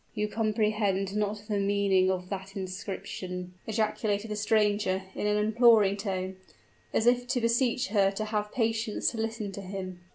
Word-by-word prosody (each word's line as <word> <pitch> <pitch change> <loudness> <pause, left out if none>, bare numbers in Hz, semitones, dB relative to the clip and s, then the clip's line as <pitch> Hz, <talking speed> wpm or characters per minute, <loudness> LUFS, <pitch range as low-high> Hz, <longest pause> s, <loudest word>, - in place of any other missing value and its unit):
'" - - -36
"You 210 -1 0
comprehend 210 -3 0
not 210 0 -1
the 210 -2 0
meaning 200 -2 +3
of 180 -1 -2
that 195 0 -6
inscription!" 185 -1 -5
ejaculated 215 -1 -1
the - - -1
stranger, 210 -2 +1
in 210 - -2
an 210 0 +2
imploring 215 -2 +5
tone, 190 -2 -3 0.5
as 225 - +1
if 245 0 +3
to 250 0 +1
beseech 235 0 +1
her 200 -2 +4
to 200 +2 -3
have 210 -1 -2
patience 225 -2 0
to 235 - -7
listen 225 -2 -3
to 200 - -7
him. 185 -1 -6
210 Hz, 165 wpm, -29 LUFS, 195-220 Hz, 0.5 s, imploring